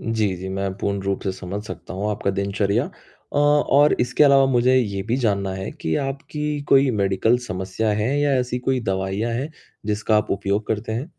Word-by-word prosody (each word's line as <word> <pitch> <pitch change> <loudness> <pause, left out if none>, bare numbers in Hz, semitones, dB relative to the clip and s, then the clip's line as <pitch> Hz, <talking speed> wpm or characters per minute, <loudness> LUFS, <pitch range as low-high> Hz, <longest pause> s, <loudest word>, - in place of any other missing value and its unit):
जी, 110 -4 0
जी, 95 +2 -6
मैं 95 0 -2
पूर्ण 100 -1 -1
रूप 100 0 -1
से 95 - -1
समझ 95 +2 -6
सकता 90 -1 -8
हूँ 100 +3 -2
आपका 100 -1 -1
दिनचर्या। 100 +4 0
अ, - - -13
और 145 0 +4
इसके 125 +5 +3
अलावा 140 -1 +6
मुझे 130 -1 +3
ये 100 -6 0
भी 115 +5 -1
जानना 100 -6 0
है, 95 +2 -5
कि 80 - -3
आपकी 145 +2 -3
कोई 135 -1 +5
मेडिकल 100 +5 +2
समस्या 95 +4 -2
है 110 +7 0
या 145 -1 +2
ऐसी 125 0 -2
कोई 130 +1 0
दवाइयाँ 95 +4 -1
हैं, 130 +7 -3 0.4
जिसका 110 +1 +1
आप 105 - 0
उपयोग 100 +2 -1
करते 110 +1 -2
हैं? 125 +9 -4
110 Hz, 195 wpm, -22 LUFS, 100-130 Hz, 0.4 s, अलावा